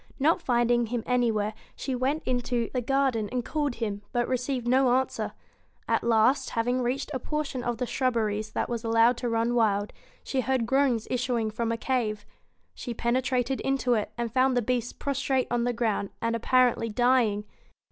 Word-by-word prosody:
Not 320 +6 +2
finding 240 -2 +2
him 235 0 -2
anywhere, 225 -4 +1 0.2
she 270 - -4
went 265 +5 0
into 245 -2 -1
the 255 - +1
96 - - -13
garden 265 -6 +1
and 245 -2 -2
called 290 -5 -1
him, 210 -3 -3
but 240 0 0
received 255 -1 -2
no 255 0 +4 1.0
At - - +1
last, 235 +4 +3
having 245 +2 0
reached 260 +4 -2
a 260 - -1
portion 285 -2 -3
of 240 -1 -2
the 250 - -1
shrub 255 0 0
beries 215 -1 -1
that - - -1
was 235 -1 -3
allowed 230 +2 +4
to 245 - -2
run 230 +1 +1
wild, 210 -3 +1 0.3
she 265 - -1
heard 255 -1 0
groans 255 -3 +1
issuing 240 -3 0
from 230 +1 -2
a 230 - -1
cave. 225 -4 -1 0.5
She 240 -2 -6
penetrated 255 +2 0
into 270 -2 +1
it, 215 -3 -1
and 235 -2 -3
found 260 0 +3
the 245 - +2
Beast 245 0 -2
prostrate 270 -2 0
on 240 0 +1
the 245 - +1
ground, 220 -4 -1
and 230 0 0
apparently 245 0 +2
dying. 235 -2 +2
245 Hz, 180 wpm, -27 LUFS, 230-255 Hz, 1.0 s, no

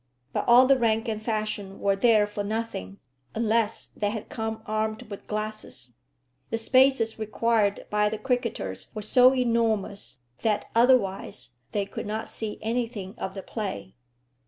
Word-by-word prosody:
But - - -1
all 245 +2 +8
the 270 0 +4
rank 225 0 +1
and 215 -1 -2
fashion 215 -3 -3
were 200 -1 +2
there 215 0 +4
for 205 0 -4
nothing, 210 - -4 0.4
unless 225 0 +1
they 205 - -3
had 215 0 -5
come 220 0 -4
armed 215 +2 -2
with 200 - -8
glasses. 215 - -5 0.6
The 225 - -1
spaces 250 -1 +3
required 215 -1 +1
by 210 0 +3
the 220 - -3
cricketers 230 - -2
were 215 - -4
so 250 +4 +6
enormous 230 - 0 0.2
that 210 -2 +1
otherwise 200 - +2 0.2
they 205 -1 0
could 200 - -6
not 215 +1 -3
see 220 -2 -4
anything 225 -4 -2
of 190 - -4
the 195 - -6
play. 185 - -5
215 Hz, 150 wpm, -26 LUFS, 205-230 Hz, 0.6 s, all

